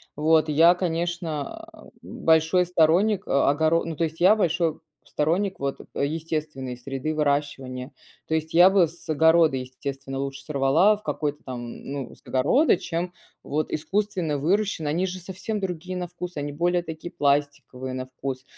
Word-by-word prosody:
Вот 155 +1 +3
я, 165 +4 +6
конечно, 170 -4 -3
а, - - -15
большой 160 +3 +2
сторонник, 180 +4 +2
а, 140 0 +3
огоро 160 +3 +2
ну, 165 -1 -4
то 165 - -1
есть 160 +1 -7
я 200 +4 +7
большой 165 -5 0 0.3
сторонник 180 +6 0
вот 140 0 -3 0.2
естественной 150 -3 -3
среды 135 +4 -4
выращивания, 140 -3 -2 0.3
то 160 - -2
есть 160 0 -3
я 175 +3 +8
бы 190 -4 +4
с 170 +1 -13
огорода, 160 -1 +4
естественно, 135 +1 -6
лучше 135 0 -5
сорвала 155 +9 +3
в 210 - -20
какой-то 150 -7 -3
там, 120 -2 -6
ну, 140 -2 -6
с - - -25
огорода, 155 - +3
чем 175 +1 -4 0.3
вот 155 +1 -2
искусственно 175 -1 -1
выращенные, 180 0 0
они 180 +5 0
же 185 0 -5
совсем 190 +4 -5
другие 185 0 -4
на 180 -1 -3
вкус, 180 0 -7
они 145 0 -3
более 175 +3 +1
такие 165 +1 -7
пластиковые 140 -2 -1
на 130 0 -5
вкус. 130 0 -5
160 Hz, 160 wpm, -25 LUFS, 140-175 Hz, 0.3 s, я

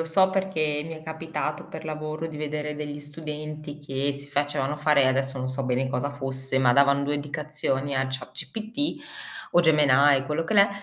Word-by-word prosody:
lo 165 - 0
so 190 +3 +4
perché 155 -6 0
mi 165 +1 -6
è 155 - -10
capitato 160 -1 -4
per - - -8
lavoro 155 +1 -4
di 155 -2 -7
vedere 150 0 -3
degli 150 -1 -5
studenti 150 0 -7
che 140 0 -1
si 140 +1 -10
facevano 145 0 0
fare 150 -3 +4
adesso 135 +1 +1
non 130 0 -2
so 130 +1 -3
bene 130 +1 0
cosa 140 +1 -1
fosse, 135 -1 -2
ma 125 -2 +5
davan 140 +1 +4
2 145 +1 0
indicazioni 145 -1 -2
a 130 0 +1
ChatGPT 220 - -3 0.5
o 175 - +5
Gemini, 145 -3 +5
quello 150 +3 -1
che 210 - -1
l'è, 200 0 +7
150 Hz, 185 wpm, -26 LUFS, 135-155 Hz, 0.5 s, l'è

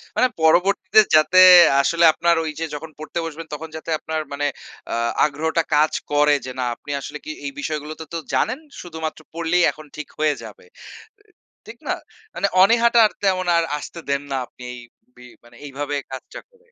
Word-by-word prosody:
মানে 255 - +4
পরবর্তীতে 190 +5 +4
যাতে 155 +4 +5 0.4
আসলে 170 +4 +2
আপনার 170 +1 +2
ওই 160 - -3
যে 165 - -1
যখন 160 +2 -7
পড়তে 155 +2 -5
বসবেন 165 0 -7
তখন 160 +2 -6
যাতে 160 +1 -8
আপনার 160 0 -3
মানে 145 +1 -1 0.5
আ - - 0 0.3
আগ্রহটা 160 +3 -1
কাজ 155 +1 +3 0.2
করে 145 0 +4
যে 130 - -5
না - - 0
আপনি 145 - -10
আসলে - - -7
কি 310 - -5
এই 275 - -3
বিষয়গুলো 155 - -4
তো, 160 - -7
তো - - -2 0.2
জানেন, 255 +5 0 0.2
শুধুমাত্র 160 -3 -6
পড়লেই 170 +2 +1
এখন 155 - -14
ঠিক 150 - -7
হয়ে 155 -1 +2
যাবে। 475 - -12 0.6
এ - - -24 0.4
ঠিক - - -11
না? - - +1 0.4
মানে 200 - 0 0.2
অনীহাটা 235 +3 +5 0.2
তেমন 185 -2 +1
আর 170 - +2
আসতে 170 +3 -9
দেন 140 0 0
না 135 - -1
আপনি 125 - -17
এই 125 - -9 0.4
বি 125 - -15 0.4
এইভাবে 145 +1 -4 0.2
কাজটা 130 - -8
করে। 480 0 -29
হু, - - -32
160 Hz, 185 wpm, -21 LUFS, 150-180 Hz, 0.6 s, যাতে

